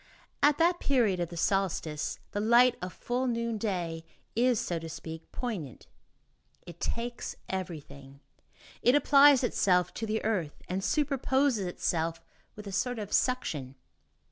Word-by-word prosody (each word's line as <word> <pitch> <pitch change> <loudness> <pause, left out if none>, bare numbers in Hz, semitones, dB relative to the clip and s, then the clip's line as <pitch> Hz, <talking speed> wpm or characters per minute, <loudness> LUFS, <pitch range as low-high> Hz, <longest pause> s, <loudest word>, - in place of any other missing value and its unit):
At 290 0 +5
that 345 +1 +3
period 230 -9 +2
of 175 -1 -2
the 170 - -8
solstice, 165 -5 -1
the 205 - -2
light 240 +4 +5
of 180 0 -4
full 250 +6 -2
noonday 210 -8 -2 0.3
is, 240 0 +3
so 170 -2 -2
to 165 0 -7
speak, 160 0 -8
poignant. 185 - -5 0.8
It 170 -1 -11
takes 235 +1 -3
everything. 140 -7 -6 0.6
It 245 - +4
applies 285 -1 +6
itself 180 -7 +2
to 225 - -4
the 215 0 -2
earth, 185 -9 -2
and 185 +2 -2
superposes 265 - +1
itself 165 -2 -1 0.4
with 210 - -10
a 200 - -6
sort 245 +6 -1
of 210 -2 -5
suction. 150 - 0
205 Hz, 140 wpm, -29 LUFS, 170-245 Hz, 0.8 s, applies